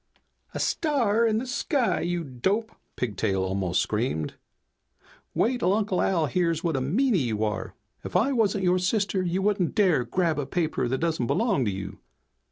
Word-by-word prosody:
"A -, -, -2 dB
star 235 Hz, -8 st, +1 dB
in 215 Hz, -1 st, +1 dB
the 240 Hz, -, -2 dB
sky, 255 Hz, +1 st, 0 dB
you 175 Hz, 0 st, -1 dB
dope!" 190 Hz, -, -1 dB, 0.2 s
Pigtail 100 Hz, -4 st, -1 dB
almost 95 Hz, -2 st, 0 dB
screamed. 105 Hz, -, -2 dB, 1.0 s
"Wait'll 235 Hz, -6 st, +2 dB
Uncle 205 Hz, -4 st, 0 dB
Al 170 Hz, -5 st, +2 dB
hears 165 Hz, +2 st, 0 dB
what 165 Hz, -4 st, 0 dB
a 135 Hz, -, 0 dB
meanie 205 Hz, -, +2 dB
you 110 Hz, -3 st, -1 dB
are. 105 Hz, -1 st, -3 dB, 0.3 s
If -, -, -8 dB
I 225 Hz, +10 st, +3 dB
wasn't 205 Hz, -5 st, +1 dB
your 180 Hz, 0 st, +3 dB
sister 195 Hz, +1 st, 0 dB
you 185 Hz, +1 st, -1 dB
wouldn't 200 Hz, -4 st, +1 dB
dare 185 Hz, -, +3 dB
grab 165 Hz, +5 st, 0 dB
a 140 Hz, -, -3 dB
paper 155 Hz, -5 st, -1 dB
that 130 Hz, +2 st, 0 dB
doesn't 160 Hz, -6 st, -1 dB
belong 200 Hz, -, +1 dB
to 105 Hz, -, 0 dB
you." 95 Hz, 0 st, -6 dB
175 Hz, 170 wpm, -26 LUFS, 125-210 Hz, 1.0 s, I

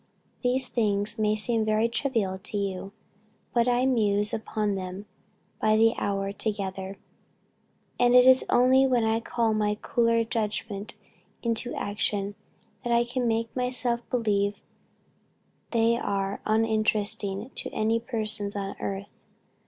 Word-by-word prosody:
These 255 Hz, +1 st, +2 dB
things 210 Hz, -1 st, 0 dB
may 215 Hz, 0 st, +2 dB
seem 220 Hz, +1 st, 0 dB
very 215 Hz, +1 st, +2 dB
trivial 230 Hz, -6 st, -1 dB
to 210 Hz, -, -2 dB
you, 195 Hz, -1 st, -3 dB, 0.6 s
but 235 Hz, 0 st, +3 dB
I 245 Hz, +1 st, +3 dB
muse 210 Hz, -5 st, +2 dB
upon 215 Hz, -1 st, -1 dB
them 190 Hz, +1 st, -5 dB, 0.6 s
by 215 Hz, 0 st, +4 dB
the 225 Hz, +1 st, +5 dB
hour 195 Hz, -1 st, -1 dB
together; 195 Hz, -2 st, -4 dB, 1.0 s
and 245 Hz, 0 st, +5 dB
it 250 Hz, 0 st, +8 dB
is 260 Hz, 0 st, +7 dB
only 260 Hz, +2 st, +5 dB
when 245 Hz, -3 st, +2 dB
I 220 Hz, 0 st, +2 dB
call 230 Hz, -1 st, 0 dB
my 210 Hz, -1 st, +1 dB
cooler 230 Hz, -1 st, +2 dB
judgment 210 Hz, -2 st, -3 dB, 0.5 s
into 235 Hz, +1 st, 0 dB
action, 205 Hz, 0 st, -2 dB, 0.5 s
that 240 Hz, -, -2 dB
I 235 Hz, 0 st, +4 dB
can 245 Hz, 0 st, -2 dB
make 230 Hz, 0 st, -1 dB
myself 250 Hz, -1 st, 0 dB
believe 205 Hz, -4 st, 0 dB, 1.1 s
they 230 Hz, 0 st, +3 dB
are 195 Hz, -2 st, -2 dB
uninteresting 215 Hz, 0 st, 0 dB
to -, -, -4 dB
any 220 Hz, +1 st, +1 dB
person 220 Hz, -3 st, -2 dB
on 195 Hz, -1 st, -4 dB
earth. 195 Hz, 0 st, -3 dB
220 Hz, 130 wpm, -27 LUFS, 205-235 Hz, 1.1 s, it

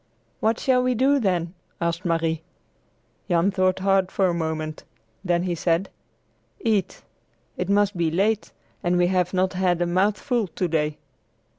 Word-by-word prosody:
"What 225 Hz, +1 st, +1 dB
shall 255 Hz, -1 st, +3 dB
we 250 Hz, 0 st, +1 dB
do, 275 Hz, +4 st, +3 dB
then?" 180 Hz, -6 st, 0 dB, 0.3 s
asked 170 Hz, +2 st, -2 dB
Marie. 165 Hz, -1 st, 0 dB, 0.9 s
Jan 175 Hz, +2 st, +3 dB
thought 185 Hz, -1 st, +1 dB
hard 190 Hz, -1 st, +2 dB
for 195 Hz, -, +1 dB
a 180 Hz, -, +2 dB
moment. 160 Hz, -2 st, -3 dB, 0.4 s
Then 175 Hz, -2 st, +1 dB
he 180 Hz, -1 st, -1 dB
said: 170 Hz, +2 st, 0 dB, 0.7 s
"Eat! 215 Hz, -4 st, -1 dB, 0.5 s
It 180 Hz, -, -3 dB
must 205 Hz, 0 st, +2 dB
be 170 Hz, -2 st, +1 dB
late, 205 Hz, +6 st, 0 dB, 0.3 s
and 180 Hz, 0 st, +1 dB
we 175 Hz, -, +4 dB
have 180 Hz, -1 st, +1 dB
not 185 Hz, 0 st, +1 dB
had 180 Hz, -2 st, +1 dB
a 175 Hz, -, +1 dB
mouthful 205 Hz, +6 st, +1 dB
to 180 Hz, +1 st, -2 dB
day." 155 Hz, -2 st, -1 dB
185 Hz, 155 wpm, -24 LUFS, 170-200 Hz, 0.9 s, we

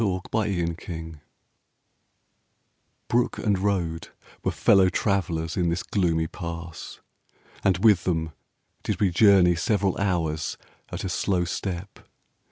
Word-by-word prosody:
THE 100 Hz, -5 st, +1 dB, 0.2 s
SIMPLON 95 Hz, -6 st, 0 dB
PASS 80 Hz, -3 st, -8 dB, 1.9 s
Brook 120 Hz, +1 st, +1 dB
and 100 Hz, -4 st, 0 dB
road 90 Hz, -5 st, -1 dB, 0.4 s
Were -, -, +1 dB
fellow 95 Hz, -2 st, +4 dB
travellers 85 Hz, -5 st, -1 dB
in 90 Hz, -2 st, +1 dB
this 85 Hz, +2 st, -1 dB
gloomy 85 Hz, -5 st, 0 dB
Pass, 85 Hz, 0 st, -7 dB, 0.6 s
And 95 Hz, -2 st, +3 dB
with 105 Hz, -6 st, +5 dB
them 80 Hz, -3 st, -1 dB, 0.5 s
did -, -, -3 dB
we 100 Hz, -3 st, +2 dB
journey 95 Hz, -2 st, +6 dB
several 100 Hz, +2 st, +1 dB
hours 80 Hz, -6 st, -1 dB, 0.3 s
At -, -, -5 dB
a -, -, -2 dB
slow 90 Hz, -1 st, 0 dB
step. 90 Hz, +2 st, -5 dB
90 Hz, 120 wpm, -25 LUFS, 85-100 Hz, 1.9 s, journey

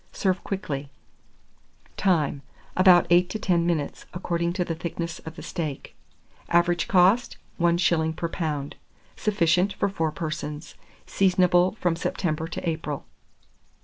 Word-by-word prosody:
Serve 185 Hz, -2 st, -1 dB
quickly. 150 Hz, -8 st, -4 dB, 1.1 s
Time. 155 Hz, -7 st, +1 dB, 0.3 s
About 185 Hz, -2 st, +6 dB
8 175 Hz, +1 st, +5 dB
to 215 Hz, -, -3 dB
10 175 Hz, -5 st, +1 dB
minutes, 155 Hz, -4 st, -2 dB
according 170 Hz, -1 st, -1 dB
to 180 Hz, -1 st, -1 dB
the 165 Hz, -, -2 dB
thickness 170 Hz, 0 st, -5 dB
of 160 Hz, -, -7 dB
the -, -, -9 dB
steak. 155 Hz, -6 st, -5 dB, 0.5 s
Average 175 Hz, 0 st, +2 dB
cost, 195 Hz, +6 st, +3 dB, 0.2 s
1s. 170 Hz, -2 st, +2 dB
per 170 Hz, -, -2 dB
lb. 150 Hz, -5 st, -3 dB, 0.4 s
Sufficient 190 Hz, -1 st, +2 dB
for -, -, 0 dB
4 160 Hz, -5 st, -1 dB
persons. 155 Hz, -1 st, -5 dB, 0.3 s
Seasonable 180 Hz, -1 st, +3 dB
from 175 Hz, -3 st, +1 dB
September 165 Hz, -2 st, -2 dB
to 175 Hz, -, -5 dB
April. 155 Hz, -3 st, -3 dB
170 Hz, 125 wpm, -25 LUFS, 160-180 Hz, 1.1 s, About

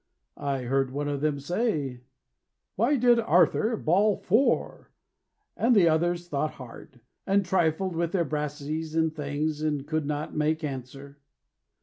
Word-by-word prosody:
I 140 Hz, -3 st, -2 dB
heard 135 Hz, +2 st, 0 dB
one 145 Hz, +2 st, -3 dB
of 145 Hz, -1 st, -2 dB
them 150 Hz, -2 st, 0 dB
say 145 Hz, -, -2 dB, 0.7 s
"Why 235 Hz, +9 st, +2 dB
did 240 Hz, -1 st, +4 dB
Arthur 225 Hz, 0 st, +3 dB
Bawl 200 Hz, +5 st, +2 dB
Fore?" 225 Hz, +9 st, 0 dB, 0.7 s
And 240 Hz, +1 st, +3 dB
the 185 Hz, -5 st, +6 dB
others 175 Hz, +2 st, 0 dB
thought 150 Hz, -1 st, -2 dB
hard, 125 Hz, 0 st, -12 dB, 0.3 s
And 195 Hz, 0 st, +2 dB
trifled 180 Hz, 0 st, 0 dB
with 170 Hz, 0 st, -1 dB
their 180 Hz, -3 st, +1 dB
brassies 150 Hz, +2 st, -4 dB
and 160 Hz, -1 st, +1 dB
things, 150 Hz, +1 st, -2 dB
And 150 Hz, -3 st, -1 dB
could 155 Hz, -1 st, -2 dB
not 150 Hz, 0 st, -3 dB
make 155 Hz, +1 st, 0 dB
answer. 140 Hz, 0 st, -7 dB
155 Hz, 140 wpm, -27 LUFS, 145-180 Hz, 0.7 s, the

